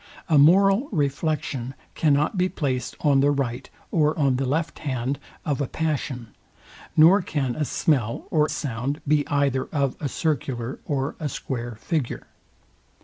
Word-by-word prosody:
A 155 -5 +4
moral 195 - +5
reflection 140 - -1 0.2
cannot 150 +3 +2
be 185 0 +1
placed 130 -7 -2
on 140 -2 +4
the 140 +1 +4
right 135 -3 -2 0.2
or 155 -1 +2
on 135 -4 +2
the 135 0 -1
left 160 +4 -1
hand 130 -1 -2 0.3
of 145 -2 -1
a 140 - 0
passion, 140 -7 -3 0.7
nor 170 +6 +7
can 140 -8 -2
a 150 - -1
smell 130 -7 0
or 155 -1 +3
sound 135 +1 -3
be 150 0 +2
either 140 -2 +1
of 140 -4 -1
a 145 - -2
circular 135 -6 -2
or 140 -1 -2
a 155 -3 -2
square 120 -4 -5
figure. 145 +4 -3
145 Hz, 145 wpm, -24 LUFS, 130-155 Hz, 0.7 s, nor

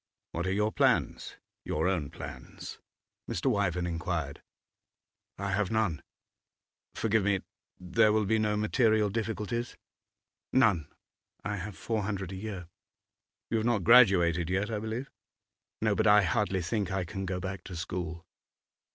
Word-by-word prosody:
'What 85 +2 -2
are - - +1
your 105 +2 +1
plans - - +1 0.3
your 80 - 0
own 85 -7 0
plans?' 65 -3 -9 0.5
Mr. 130 +10 +1
Wyvern 90 -5 0
inquired. 80 -4 -3 1.0
'I 100 0 -2
have 100 0 +1
none.' 105 -10 0 0.9
'Forgive 110 -2 +2
me; 100 -1 +2 0.4
there 95 +5 +3
will 105 0 +2
be 110 +2 +2
no 105 -1 +1
material 110 -1 +2
difficulties?' 115 +2 -3 0.8
'None; 105 - +4 0.6
I 105 0 -2
have 95 0 -6
four 110 -2 -1
hundred 100 -2 -3
a - - -5
year.' 95 -3 -6 0.8
'You 115 - +2
have 110 - 0
not 115 -6 +2
graduated 90 -8 +6
yet, 100 +4 0
I 105 - -1
believe?' 110 +5 -4 0.7
'No. 110 -1 +3
But 100 - +2
I 105 -1 +7
hardly 95 -1 0
think 100 +2 -1
I 95 -1 -1
can 95 +3 -5
go 90 0 -2
back 95 +1 -5
to 90 - -7
school. 85 0 -4
100 Hz, 145 wpm, -30 LUFS, 90-110 Hz, 1.0 s, I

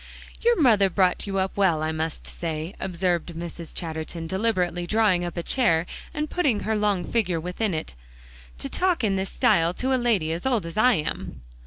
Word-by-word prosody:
"Your 475 -2 +3
mother 215 -9 +5
brought 185 +1 +1
you 195 -1 -2
up 190 0 -1
well, 175 -6 +2
I 155 - 0
must 160 0 -3
say," 160 +1 -4
observed 175 -2 -1
Mrs. 170 0 -7
Chatterton, 165 0 -4
deliberately 180 -2 0
drawing 210 -5 +3
up 175 0 -5
a 170 - -2
chair 170 -11 +2 0.3
and 300 0 -2
putting 285 - +1
her 220 - 0
long 205 -3 +1
figure 185 -4 0
within 180 +3 -2
it, 155 - -5 0.6
"to - - -4
talk 360 -7 0
in 200 -3 +2
this 190 0 -2
style 165 +2 +2
to 260 +1 0
a 255 - +1
lady 205 -10 +1
as 170 +9 -2
old 240 -8 +1
as 165 - -7
I 245 +4 +5
am." 150 - -4
185 Hz, 190 wpm, -25 LUFS, 165-220 Hz, 0.6 s, mother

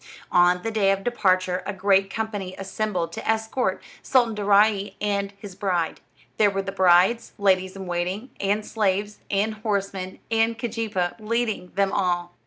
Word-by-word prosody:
On 180 0 +4
the 225 - -2
day 210 -3 +2
of 195 0 +1
the 245 - 0
departure 185 -4 +1
a 205 - -2
great 195 0 +2
company 205 -4 -4
assembled 195 -3 -2
to 170 - -6
escort 220 +3 0 0.2
Sultan 240 -4 +2
Daaraaee 205 0 +3
and 200 -1 -1
his 200 -1 -10
bride. 180 -4 -1 0.4
There 210 -1 +5
were 195 0 -2
the 195 - -4
bride's 190 +4 +3
ladies 190 -2 +2
in 195 -1 -7
waiting, 180 +7 -3
and 205 +2 0
slaves, 205 -1 -1
and 205 +2 +1
horsemen, 200 -3 -3
and 225 0 +2
Keejeepaa 220 -6 -2
leading 220 -4 -2
them 195 0 +2
all. 175 -3 0
200 Hz, 160 wpm, -24 LUFS, 185-215 Hz, 0.4 s, There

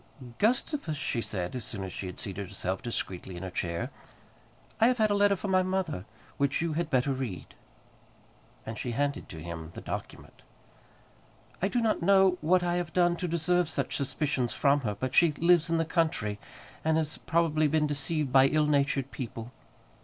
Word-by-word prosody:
"Gustavus," 235 - +1
she 120 -4 -1
said, 90 -1 -3
as 125 - -4
soon 105 -5 -5
as 95 - -6
she 95 - -5
had 90 - -7
seated 100 0 -5
herself 95 +1 -3
discreetly 95 -6 -4
in 85 - -7
her 95 - -5
chair, 85 -1 -2 0.9
"I 225 - +6
have 250 0 +2
had 215 -2 +3
a - - +4
letter 200 0 +4
from 195 +1 -4
my 185 0 +5
mother, 185 - -2 0.3
which 140 0 +1
you 165 -1 -1
had 165 0 -1
better 135 0 +2
read;" 125 -9 -5 1.1
and 110 -1 -6
she 120 - -3
handed 145 +3 -1
to 80 - -8
him 80 -1 -6
the - - -5
document. - - -7 1.2
"I 190 - +3
do 240 +4 0
not 220 -4 +1
know 190 0 +4
what 175 +3 +3
I 175 0 +1
have 175 -3 -3
done 175 0 +3
to 180 - -2
deserve 170 +1 +1
such 140 -3 -2
suspicions 135 -3 -1
from 140 0 +3
her; 105 -6 -2
but 130 0 -2
she 170 -3 +5
lives 170 +1 +3
in 165 - +2
the 165 - +1
country, 155 - 0 0.4
and 160 0 +2
has 155 -1 -1
probably 160 -2 +2
been 150 +1 +2
deceived 145 0 -1
by 135 0 +7
ill 155 +2 +2
natured 140 -2 +1
people. 115 -2 -6
150 Hz, 190 wpm, -29 LUFS, 120-175 Hz, 1.2 s, by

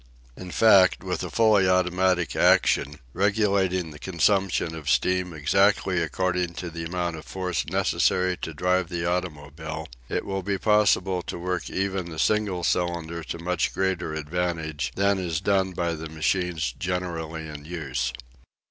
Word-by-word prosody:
In 90 - -9
fact, 95 -2 +5
with - - -2
a - - -4
fully 105 -4 +4
automatic 90 -1 +2
action, 75 +2 +3 0.2
regulating 95 -3 +1
the 75 - -11
consumption 95 -1 +1
of 75 -3 -5
steam 90 -1 +1
exactly 95 +3 +2
according 90 +1 -1
to 90 -1 -5
the 85 0 -5
amount 85 -1 -2
of 75 - -9
force 90 -4 -3
necessary 90 0 +1
to - - -5
drive 90 +3 0
the 85 -1 -3
automobile, 80 -3 -4 0.2
it - - -2
would 95 -2 -3
be 100 -1 0
possible 95 -3 +2
to - - -6
work 90 +1 -3
even 95 -2 -2
a 80 - -8
single 100 0 +1
cylinder 85 -2 -1
to 70 +5 -5
much 85 0 -1
greater 90 -4 -1
advantage 80 -3 -2
than 100 0 +2
is 85 -4 -2
done 95 0 +1
by 85 -1 -1
the 80 0 -6
machines 80 -3 -1
generally 85 -3 -3
in 75 -1 -8
use. 65 -7 -3
90 Hz, 150 wpm, -25 LUFS, 80-95 Hz, 0.2 s, fact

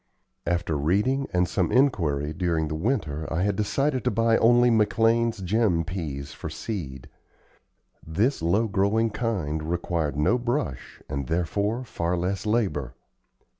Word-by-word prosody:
After 85 -2 0
reading 105 - +1
and 90 0 +2
some 90 -1 0
inquiry 80 - +2
during 80 -2 0
the - - -3
winter 80 - -2
I 80 +3 0
had 100 0 +1
decided 130 +6 0
to - - +4
buy 115 +1 +2
only 120 +1 +5
McLean's 115 0 +2
Gem 95 -3 +2
peas 75 -6 -5
for - - -7
seed. 70 - -6 1.0
This 100 - 0
low 100 +8 +2
growing 105 +3 +1
kind 100 -10 -2
required 80 -3 -2
no 95 +12 +2
brush 120 - -3
and, 70 -2 -4
therefore, 100 - -1
far 90 -7 -2
less 95 +4 -2
labor. 100 - 0
95 Hz, 135 wpm, -25 LUFS, 80-115 Hz, 1.0 s, only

